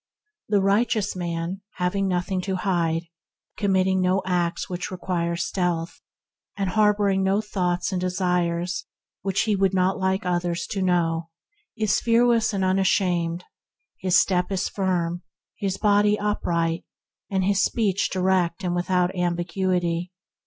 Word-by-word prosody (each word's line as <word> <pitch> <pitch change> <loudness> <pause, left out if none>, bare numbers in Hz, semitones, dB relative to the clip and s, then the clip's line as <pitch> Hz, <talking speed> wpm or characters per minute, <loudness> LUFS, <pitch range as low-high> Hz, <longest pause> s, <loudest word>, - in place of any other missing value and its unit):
The 205 -2 +3
righteous 205 0 +1
man, 175 +1 -3
having 185 +2 0
nothing 185 +1 -1
to 190 0 -2
hide, 170 -3 0 0.5
committing 190 -2 +2
no 185 +1 +2
acts 175 -2 0
that 180 +2 -4
require 175 -2 -2
stealth, 175 -1 -2 0.6
and 195 -2 -1
harboring 205 -2 +3
no 190 +2 +2
thoughts 180 -4 -1
and 185 -2 -1
desires 180 -1 -1 0.4
that 195 0 -2
he 215 -2 +2
would 195 -1 +2
not 185 +1 +2
like 190 0 0
others 175 -1 -1
to 200 -3 -2
know, 170 -2 +1 0.5
is 215 -3 +2
fearless 230 -1 +3
and 195 -2 0
unashamed. 180 -2 +1 0.6
His 185 -2 +3
step 180 0 +1
is 190 -1 -1
firm, 175 -3 -1 0.3
his 195 -1 -2
body 205 0 +3
upright, 170 -5 -1 0.5
and 190 -1 0
his 195 0 +2
speech 200 -4 +1
direct 185 -1 +1
and 180 -1 0
without 180 +1 +1
ambiguity. 175 0 -1
185 Hz, 130 wpm, -24 LUFS, 175-195 Hz, 0.6 s, The